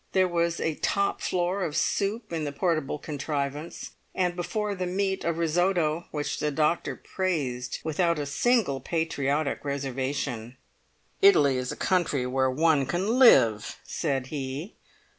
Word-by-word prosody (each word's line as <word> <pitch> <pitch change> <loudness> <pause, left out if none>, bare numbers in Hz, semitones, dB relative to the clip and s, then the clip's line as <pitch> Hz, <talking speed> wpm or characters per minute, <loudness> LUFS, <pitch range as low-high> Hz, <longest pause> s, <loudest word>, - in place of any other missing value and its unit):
There 185 -1 +4
was 170 -1 0
a 160 - 0
top 200 0 0
floor 180 +2 0
of 160 -2 -2
soup 210 +3 -1
in 160 -2 -1
the 145 - -2
portable 155 -2 -1
contrivance, 145 +1 -4 0.2
and 180 -1 0
before 210 +4 -2
the 185 -2 -3
meat 190 +1 -1
a 170 - +1
risotto, 170 0 +1
which 145 -1 -3
the 150 - 0
doctor 155 +3 0
praised 140 -10 -2
without 170 +1 +1
a 145 - -2
single 170 - +1
patriotic 155 -3 -1
reservation. 135 -3 -3 0.6
"Italy 145 - +6
is 125 0 -2
a - - -5
country 170 -8 +1
where 130 +1 +1
one 150 0 +2
can 195 - 0
live," 115 - +5
said 135 -6 -2
he. 140 +6 -4
160 Hz, 140 wpm, -27 LUFS, 140-180 Hz, 0.6 s, Italy